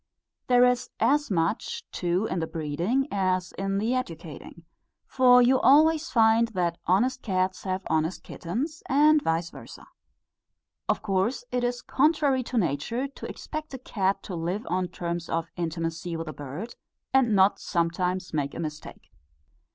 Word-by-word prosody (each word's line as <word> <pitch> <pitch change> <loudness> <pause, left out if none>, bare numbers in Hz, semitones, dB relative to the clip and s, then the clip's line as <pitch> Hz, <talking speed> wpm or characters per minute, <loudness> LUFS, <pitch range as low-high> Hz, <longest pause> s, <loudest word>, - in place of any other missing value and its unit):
There 245 0 +6
is 250 -1 +1
as 295 +1 +2
much 165 -4 -1
too 180 +3 0
in 185 - -2
the 160 - -2
breeding, 170 - -1
as 185 -2 0
in 195 0 -2
the 220 +5 0
educating; 170 - -6 0.4
for 250 -1 +5
you 255 +2 +4
always 315 +3 +5
find 225 0 +4
that 170 -2 0
honest 245 +8 +2
cats 185 -2 -1
have 185 0 -2
honest 160 +2 -1
kittens, 275 - -4
and 300 +3 +5
vice 165 -3 -1
versâ. - - -12 1.0
Of - - 0
course 205 +5 0
it 250 0 0
is 245 0 -2
contrary 285 -2 +2
to 250 - -3
nature 215 - -1
to 275 - -9
expect 310 -3 -6
a - - -5
cat 195 -6 -1
to 190 - -7
live 175 +6 -3
on 180 0 0
terms 170 -1 -5
of 165 0 -2
intimacy 165 0 -3
with 165 0 -5
a 155 - -5
bird 145 - -7 0.4
and 250 -5 +4
not 190 +1 +4
sometimes 180 +1 -1
make 145 -2 -2
a - - -6
mistake. 155 -2 -7
190 Hz, 155 wpm, -26 LUFS, 170-250 Hz, 1.0 s, There